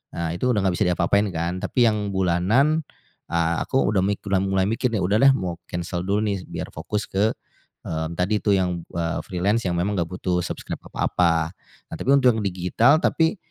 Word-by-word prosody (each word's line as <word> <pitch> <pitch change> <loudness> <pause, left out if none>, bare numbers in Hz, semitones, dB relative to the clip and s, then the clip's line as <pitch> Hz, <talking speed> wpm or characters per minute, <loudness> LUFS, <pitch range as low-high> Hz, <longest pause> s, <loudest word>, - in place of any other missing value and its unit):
Nah 85 -1 -2
itu 125 +8 0
udah 105 - +1
enggak 90 -2 +1
bisa - - +3
diapa-apain 90 +3 +2
kan. 85 +3 -2
Tapi 120 -3 +3
yang 105 -2 -1
bulanan, 100 - +2 0.5
eee, 85 0 +1
aku 135 - +1
udah 95 -2 +2
mik 100 +1 -1
udah 95 -1 +2
mulai 95 0 +1
mikir 115 +2 0
nih, 110 - 0
"Udah 100 +4 +2
deh 135 - +8
mau 90 -3 -3 0.2
cancel 85 0 -3
dulu 100 +2 0
nih 100 -1 0
biar - - -5
fokus 105 0 -3
ke, 105 +3 +1 0.5
eee, 80 0 -3
tadi 100 +4 0
itu 100 -2 +2
yang, 90 -2 -1
eee, 85 -1 -2
freelance 100 +5 0
yang 85 - -1
memang 95 +4 0
enggak 85 -1 -1
butuh 90 -1 -1
subscribe - - -5
apa-apa." 80 -1 +1 0.4
eh - - -3
tapi - - -4
untuk 130 -3 +5
yang 110 - -2
digital, 95 - +3
tapi 160 +5 +2
95 Hz, 200 wpm, -23 LUFS, 85-105 Hz, 0.5 s, deh